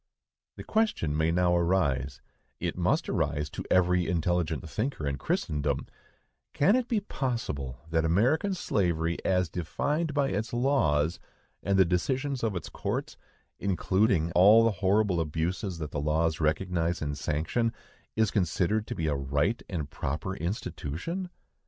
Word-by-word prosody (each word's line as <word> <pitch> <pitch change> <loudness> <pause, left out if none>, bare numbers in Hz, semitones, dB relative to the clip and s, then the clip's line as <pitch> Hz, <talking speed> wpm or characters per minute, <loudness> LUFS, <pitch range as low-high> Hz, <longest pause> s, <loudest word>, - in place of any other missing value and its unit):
The - - -8
question 215 - 0
may 80 +1 +2
now 90 0 +3
arise,—it 75 -7 -1
must - - +1
arise 75 -1 -1
to - - -5
every 90 -1 +3
intelligent 85 -3 0
thinker 110 - -3
in 70 -1 -2
Christendom,—Can 75 - -2
it 255 -1 0
be 225 -4 +1
possible 115 - -3
that 80 -1 +2
American 130 - +2
slavery, 85 - 0
as 90 -1 +2
defined 145 - -2
by 140 -2 +2
its 105 +5 -2
laws, 90 - +2 0.4
and 100 +2 +1
the 95 - +6
decisions 130 +10 -1
of 110 -4 -1
its 90 - -4
courts, - - -3 0.4
including 95 -2 +1
all 105 +7 +7
the 115 - +4
horrible 100 -2 +3
abuses 85 +4 -2
that 75 -2 -5
the 70 - -2
laws 80 +2 +1
recognize 85 +2 0
and 75 -1 -2
sanction, 80 +12 0 0.4
is 110 -2 +2
considered 100 +3 +1
to - - -4
be 80 - -2
a 75 - +1
right 70 - 0
and 80 -7 -4
proper 80 +7 -3
institution? 95 - -4
90 Hz, 140 wpm, -28 LUFS, 80-110 Hz, 0.4 s, all